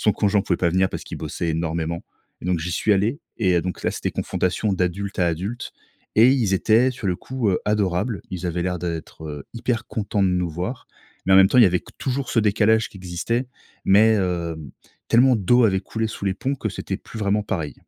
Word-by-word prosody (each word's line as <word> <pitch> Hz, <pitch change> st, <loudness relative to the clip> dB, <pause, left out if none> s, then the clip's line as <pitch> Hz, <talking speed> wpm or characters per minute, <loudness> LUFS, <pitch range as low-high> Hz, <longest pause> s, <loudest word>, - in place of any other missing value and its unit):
son 105 Hz, -, +4 dB
conjoint 100 Hz, -1 st, +2 dB
pouvait -, -, 0 dB
pas 85 Hz, -, +1 dB
venir 95 Hz, +2 st, +2 dB
parce -, -, -6 dB
qu'il -, -, -7 dB
bossait 85 Hz, -, -3 dB
énormément 80 Hz, +1 st, -2 dB, 0.4 s
et -, -, -10 dB
donc 90 Hz, -1 st, +1 dB
j'y 85 Hz, +2 st, -3 dB
suis 105 Hz, +4 st, +2 dB
allé 110 Hz, -, +1 dB, 0.2 s
et 95 Hz, -5 st, +2 dB
heu, 85 Hz, -, +3 dB
donc 90 Hz, -, -5 dB
là, -, -, +2 dB
c'était -, -, -3 dB
confrontation 95 Hz, +3 st, -1 dB
d'adulte 95 Hz, +2 st, -2 dB
à 90 Hz, -, +3 dB
adulte, 95 Hz, +9 st, -4 dB, 0.5 s
et 115 Hz, +3 st, +7 dB
ils 115 Hz, -8 st, +2 dB
étaient 115 Hz, +6 st, +4 dB
sur 120 Hz, -5 st, -6 dB
le 90 Hz, -, +1 dB
coup, 125 Hz, +2 st, -2 dB
heu, 90 Hz, -, 0 dB
adorables. 105 Hz, +1 st, 0 dB
Ils 90 Hz, -1 st, -4 dB
avaient 85 Hz, 0 st, -1 dB
l'air 90 Hz, 0 st, -1 dB
d'être, 85 Hz, -2 st, -5 dB
heu, 75 Hz, -2 st, -7 dB
hyper 115 Hz, -1 st, -2 dB
contents 105 Hz, -1 st, -1 dB
de -, -, +3 dB
nous 90 Hz, -1 st, 0 dB
voir, 90 Hz, -, -5 dB, 0.4 s
mais 95 Hz, -, +4 dB
en -, -, +8 dB
même 95 Hz, 0 st, +7 dB
temps, 125 Hz, -, +3 dB
il 120 Hz, -, +9 dB
y -, -, +8 dB
avait 90 Hz, -1 st, +1 dB
qu -, -, -17 dB
toujours 135 Hz, +1 st, -2 dB
ce 115 Hz, -, +3 dB
décalage 110 Hz, +1 st, +3 dB
qui -, -, -14 dB
existait. 95 Hz, +7 st, -2 dB, 0.4 s
Mais 110 Hz, +3 st, +5 dB
heu, 85 Hz, -3 st, -1 dB, 0.5 s
tellement 125 Hz, +1 st, +5 dB
d'eau 120 Hz, +5 st, +4 dB
avait 95 Hz, -3 st, +2 dB
coulé 110 Hz, +3 st, -3 dB
sous 110 Hz, -, -7 dB
les 95 Hz, -, +1 dB
ponts 135 Hz, +7 st, -2 dB
que 110 Hz, -, -3 dB
c'était 95 Hz, 0 st, -4 dB
plus 110 Hz, -, -10 dB
vraiment 105 Hz, 0 st, +1 dB
pareil. 80 Hz, -9 st, -3 dB
100 Hz, 230 wpm, -23 LUFS, 90-110 Hz, 0.5 s, il